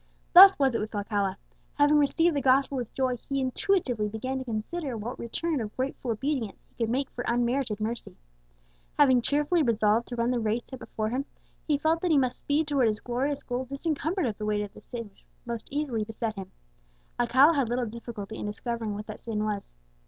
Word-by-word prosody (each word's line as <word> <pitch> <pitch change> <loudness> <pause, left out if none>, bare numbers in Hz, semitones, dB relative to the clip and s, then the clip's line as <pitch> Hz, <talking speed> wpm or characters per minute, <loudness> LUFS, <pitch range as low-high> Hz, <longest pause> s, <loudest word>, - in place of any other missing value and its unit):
Thus 385 +2 +11
was 270 -3 +2
it 230 - 0
with 215 +1 -5
Alcala. 200 -2 -1 0.4
Having 290 +1 +5
received 325 +3 +3
the 285 - +1
gospel 270 +1 +3
with 245 -3 -3
joy, 255 -2 0
he 275 +4 -3
intuitively 260 - 0
began 255 +5 -3
to - - -4
consider 250 +4 -4
what 225 +4 -5
return 300 +5 -2
of 215 -1 -6
grateful 260 -1 -3
obedience 235 -2 -2
he - - -36
could 230 -2 -2
make 265 +3 -1
for 245 - -5
unmerited 240 -2 0
mercy. 225 +2 -4 0.8
Having 260 -4 +5
cheerfully 295 +6 +1
resolved 225 -3 +2
to 245 - -5
run 235 +1 +1
the 245 - +1
race 225 +2 0
set 260 - -9
before 215 -2 -3
him, 260 +4 -2 0.4
he 295 -2 +3
felt 320 +3 +1
that 360 - 0
he 310 - +4
must 255 -2 +1
speed 295 +2 0
towards 270 -6 +3
his 210 -1 -2
glorious 265 +5 -2
goal 245 +1 -3
disencumbered 315 +5 -1
of 220 -4 -3
the 210 - -3
weight 210 -1 +1
of 205 - -8
the - - -13
sin 230 -2 -7
which 195 - -28 0.2
most 235 -2 -5
easily 275 -6 -1
beset 225 +1 -3
him. 195 -3 -8 0.7
Alcala 260 +6 +5
had 275 -6 +1
little 245 +1 0
difficulty 220 -2 -7
in - - -3
discovering 225 0 -3
what 210 +1 -6
that 215 -1 -8
sin 215 -2 -2
was. 205 - -4
245 Hz, 205 wpm, -28 LUFS, 220-280 Hz, 0.8 s, Thus